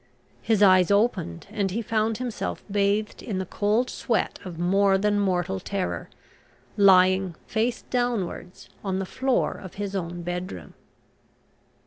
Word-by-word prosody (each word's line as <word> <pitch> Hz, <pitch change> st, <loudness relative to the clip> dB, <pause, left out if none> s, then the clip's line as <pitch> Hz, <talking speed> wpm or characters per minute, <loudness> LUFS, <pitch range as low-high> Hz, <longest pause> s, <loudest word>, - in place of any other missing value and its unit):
His 220 Hz, -2 st, +2 dB
eyes 185 Hz, -2 st, +6 dB
opened 200 Hz, -, +1 dB
and 205 Hz, -3 st, -1 dB
he 225 Hz, +5 st, -3 dB
found 220 Hz, 0 st, 0 dB
himself, 245 Hz, -3 st, -4 dB
bathed 205 Hz, +1 st, 0 dB
in 205 Hz, -5 st, -4 dB
the 190 Hz, -, -2 dB
cold 210 Hz, +6 st, +1 dB
sweat 230 Hz, -2 st, -1 dB
of 180 Hz, -4 st, -8 dB
more 195 Hz, +3 st, +3 dB
than 205 Hz, +1 st, +1 dB
mortal 190 Hz, -1 st, 0 dB
terror, 190 Hz, 0 st, -3 dB, 0.7 s
lying 185 Hz, -2 st, +5 dB
face 230 Hz, +2 st, -1 dB
downwards 235 Hz, -7 st, -3 dB, 0.2 s
on 190 Hz, -2 st, -1 dB
the 195 Hz, -, -2 dB
floor 260 Hz, +6 st, 0 dB
of 185 Hz, -, -10 dB
his 200 Hz, -1 st, -4 dB
own 175 Hz, -2 st, -4 dB
bedroom. 175 Hz, -, -5 dB
200 Hz, 135 wpm, -25 LUFS, 185-215 Hz, 0.7 s, eyes